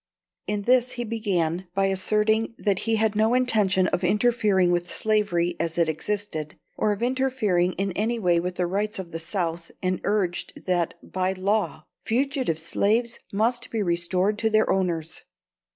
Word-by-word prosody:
In 205 -1 -1
this 250 +2 +3
he 240 - -3
began 190 -6 -1
by 195 0 +2
asserting 215 +4 +1
that 200 -3 0
he 225 - +3
had 220 -1 +1
no 220 +3 +3
intention 210 -7 +3
of 175 - -1
interfering 210 -2 +3
with 175 0 0
slavery 190 -5 +1
as 165 0 -2
it 170 -1 +3
existed, 160 -2 -3 0.2
or 210 - +1
of 205 +2 -2
interfering 245 -9 +1
in 195 +2 -2
any 220 +6 -1
way 175 -5 +2
with 180 +1 -3
the 180 - 0
rights 205 +4 -1
of 185 -3 -7
the 165 - -4
South, 170 -1 -3
and 185 -1 -1
urged 195 -4 -2
that, 175 -2 0
by 185 0 -1
law, 200 +3 -1 0.2
fugitive 260 - 0
slaves 215 +8 0
must 235 +5 0
be 220 -2 -1
restored 180 +4 0
to 220 - +2
their 215 0 +3
owners. 170 -4 -1
195 Hz, 165 wpm, -25 LUFS, 175-220 Hz, 0.2 s, this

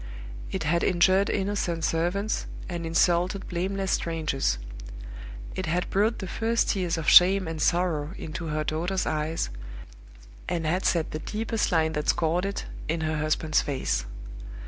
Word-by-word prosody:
It 190 - -2
had 170 +3 +1
injured 190 +2 +3
innocent 190 -4 -1
servants, 180 +6 -1 0.2
and 170 -2 -4
insulted 175 +3 +2
blameless 190 +2 -2
strangers. 155 - 0 1.0
It 185 - -4
had 175 +3 -1
brought 215 +4 +2
the 190 - -5
first 230 +4 0
tears 180 -5 0
of 160 -3 -4
shame 185 0 +7
and 160 -1 -4
sorrow 170 -1 +1
into 165 +1 -6
her 155 0 -1
daughter's 175 +5 -1
eyes, 155 - -1 1.0
and 170 -2 -1
had 180 +4 0
set 165 -3 +1
the 155 - -4
deepest 220 +5 -2
lines 160 -2 +2
that 150 -1 -2
scored 170 +3 +1
it 200 0 -3 0.2
in 160 +1 -1
her 155 0 -1
husband's 155 0 +1
face. 130 - -2
170 Hz, 145 wpm, -26 LUFS, 155-190 Hz, 1.0 s, shame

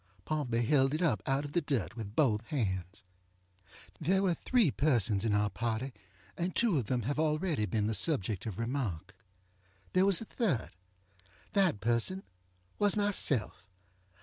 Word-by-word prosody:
Pompey 125 -7 -1
held 135 +3 +3
it 165 - -1
up 145 -11 +1
out 135 +2 +1
of 145 - -7
the 175 - +1
dirt 135 - -2
with 110 -2 -7
both 115 -9 +3
hands. 100 - -3 1.0
There 190 +5 +2
were 185 -3 +2
three 225 - +2
persons 115 -9 +1
in 110 -2 +1
our 105 -1 +1
party, 115 +6 -3 0.4
and 175 +1 -3
two 220 -11 +3
of 115 - -4
them 125 -3 -1
have 145 +6 -2
already 155 - 0
been 105 +3 0
the 110 - 0
subject 105 - +1
of 100 -4 -5
remark. 115 - -3 0.8
There 185 +1 +4
was 195 -3 +4
a 215 - -1 0.8
thirdŌĆöthat 185 - +2
person 120 - 0 0.6
was 205 0 +3
myself. 205 - 0
135 Hz, 150 wpm, -31 LUFS, 110-165 Hz, 1.0 s, There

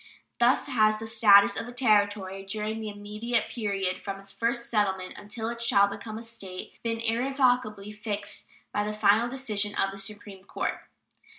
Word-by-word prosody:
Thus 240 +2 +4
has 215 -5 +3
the 220 - -6
status 200 -3 +6
of - - -4
a - - -7
Territory 205 -5 +1
during 215 +2 -3
the 215 - -4
intermediate 210 +3 -2
period 195 -5 -1
from 195 -1 -5
its 195 0 -5
first 235 +2 -1
settlement 190 -4 0
until 215 +2 -5
it 235 0 -5
shall 200 -3 +5
become 205 +2 -6
a 230 - -7
State 200 -5 -7
been 230 -1 -2
irrevocably 235 -3 +1
fixed 210 -1 -4 0.2
by 205 - 0
the 210 0 -3
final 215 +3 +3
decision 215 -6 -2
of 195 - +1
the 195 - -9
Supreme 200 -1 -6
Court. - - -3
210 Hz, 170 wpm, -27 LUFS, 200-230 Hz, 0.2 s, status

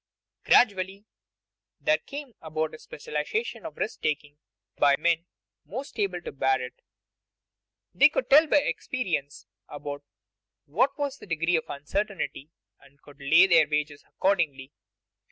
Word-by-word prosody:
Gradually 200 -2 +3 0.7
there 310 0 +2
came 280 -3 -8
about 155 0 -3
a 155 - -10
specialization 150 - -4
of - - -12
risk - - -3
taking 145 -1 -2 0.4
by 140 -1 +5
the - - -16
men 170 0 +2 0.4
most 255 +3 -7
able 190 -4 0
to - - -6
bear 135 -1 +1
it. 125 0 -8 1.1
They - - +7
could - - -2
tell 300 +3 +7
by 295 -1 +4
experience 165 - -3 0.2
about 145 -1 -6 0.6
what 240 - +1
was 285 -1 -3
the - - -12
degree 170 0 +1
of 160 - -2
uncertainty, 160 0 -3 0.3
and 140 0 -22
could 145 0 -16
lay 160 +7 +6
their 165 -5 +5
wagers 150 -1 -2
accordingly. 155 -8 0
165 Hz, 135 wpm, -27 LUFS, 145-210 Hz, 1.1 s, They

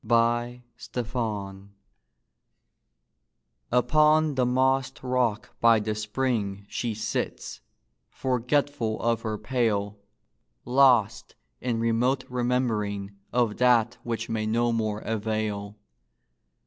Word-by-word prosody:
THE 120 +2 +1 0.2
SOLITARY 105 -5 -4 2.0
Upon 150 +5 +4
the 130 -2 +1
mossed 130 +1 +1
rock 125 -4 0
by 115 -1 +6
the 105 0 -2
spring 105 -2 -2
She 115 +1 -3
sits, 110 - -4 0.5
forgetful 125 -2 -1
of 115 -1 0
her 110 -2 -3
pail, 105 -5 -1 0.7
Lost 125 -4 +3 0.3
in 120 -2 -1
remote 120 +3 +1
remembering 115 -5 -1 0.2
Of 120 -4 +1
that 120 -1 +3
which 115 -1 -3
may 110 -1 -2
no 120 +2 +1
more 110 -2 -1
avail. 110 -2 -3
115 Hz, 95 wpm, -26 LUFS, 110-125 Hz, 2.0 s, by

